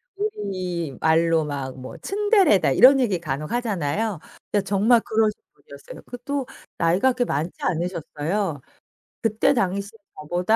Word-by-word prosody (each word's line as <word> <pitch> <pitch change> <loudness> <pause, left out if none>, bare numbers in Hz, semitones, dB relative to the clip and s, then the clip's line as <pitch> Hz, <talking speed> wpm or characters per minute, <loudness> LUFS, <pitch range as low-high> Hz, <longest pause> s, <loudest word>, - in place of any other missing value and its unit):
우리말로 170 - 0
막 135 -3 -5
뭐 130 0 -9
"츤데레다." 395 - +3
이런 265 - +7
얘기 205 -8 +1
간혹 150 -2 -4
하잖아요. 210 -4 -1 0.3
예 205 - +3
정말 205 +4 +3
그러신 220 -1 0
분이었어요. - - -13
그것도 260 +2 -4 0.3
나이가 180 +10 +3
그렇게 245 0 0
많지 160 -2 -2
않으셨어요. 170 -1 -2 0.6
그때 225 +5 +2
당시 200 -3 -1 0.3
저보다 175 +8 0
195 Hz, 305 characters per minute, -23 LUFS, 160-235 Hz, 0.6 s, 이런